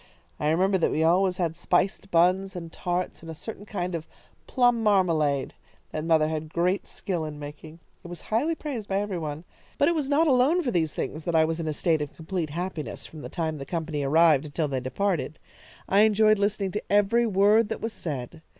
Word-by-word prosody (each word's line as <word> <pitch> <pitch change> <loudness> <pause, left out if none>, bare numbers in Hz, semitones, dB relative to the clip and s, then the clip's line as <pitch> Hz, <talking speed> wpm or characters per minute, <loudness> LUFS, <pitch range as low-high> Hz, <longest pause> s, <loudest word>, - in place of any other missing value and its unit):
I 150 - +1
remember 190 +4 +2
that - - +2
we 155 - 0
always 180 +2 +3
had 170 -3 -1
spiced 185 +3 0
buns 185 +3 +2
and 165 -2 -7
tarts 180 0 -3
and 165 - -10
a 160 - -6
certain 210 +4 -8
kind 180 -3 -3
of 165 -1 -4 0.4
plum 245 -2 +3
marmalade 165 -10 +2 0.4
that 155 - -3
mother 160 -2 +3
had 155 0 -4
great 180 +4 0
skill 180 -5 -3
in 155 -1 -6
making. 150 +2 -9 0.3
It - - -9
was 175 0 -8
highly 295 +10 0
praised 260 -10 -5
by 195 0 0
every 200 -3 -3
one. 155 0 -5 0.3
But 285 - +4
it - - +2
was 300 -4 -2
not 300 +3 +4
alone 290 +5 +3
for 250 - -1
these 160 -6 0
things 155 - -4
that 170 - -1
I 160 0 +5
was 165 +1 -2
in 165 - -3
a - - 0
state 160 0 +1
of 150 - -5
complete 165 -1 -3
happiness 170 0 -5
from 155 - -10
the - - -7
time 160 -3 -3
the - - -5
company 160 -1 -3
arrived 155 0 +4
until 150 +1 -2
they 135 -2 -2
departed. 155 +5 -2 0.5
I 195 - +3
enjoyed 215 0 +5
listening 200 -1 0
to 210 - -5
every 205 +4 +3
word 205 +2 +4
that - - -3
was 225 0 -3
said. 150 0 -5
175 Hz, 215 wpm, -26 LUFS, 155-205 Hz, 0.5 s, I